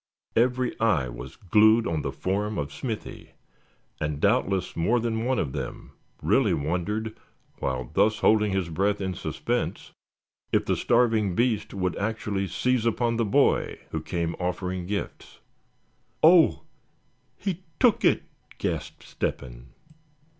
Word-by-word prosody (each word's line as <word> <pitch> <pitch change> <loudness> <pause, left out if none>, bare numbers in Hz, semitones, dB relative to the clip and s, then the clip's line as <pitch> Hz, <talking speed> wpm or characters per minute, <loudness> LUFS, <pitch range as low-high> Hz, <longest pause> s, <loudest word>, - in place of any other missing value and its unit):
Every 125 +1 +2
eye 90 - +2
was - - -9
glued 110 +4 +4
on 80 -2 -1
the - - -3
form 105 +3 -2
of 70 0 -3
Smithy, 115 -5 -6 0.7
and 75 -1 -2
doubtless 95 +3 +1
more 110 +9 +2
than 115 0 -1
one 130 0 +1
of 70 - -1
them - - -6 0.3
really 110 -10 +3
wondered 90 +9 -2 0.4
while 65 -2 -2
thus 110 +1 +3
holding 105 -1 +3
his 95 -3 -1
breath 100 +5 0
in 95 -2 -2
suspense, - - -3 0.6
if - - +2
the - - +1
starving 115 -6 +2
beast 115 -3 0
would 90 -2 -1
actually 100 -2 -2
seize 125 +5 0
upon 115 +1 +1
the 115 - +1
boy 100 - +2
who - - -2
came 85 -1 -2
offering 90 0 -3
gifts. 100 +1 -5 0.9
"Oh! 165 +1 +6 0.7
he 190 -3 -3 0.2
took 240 -4 +4
it!" - - +3 0.3
gasped - - -4
Step - - -3
hen. - - -11
105 Hz, 135 wpm, -26 LUFS, 90-115 Hz, 0.9 s, Oh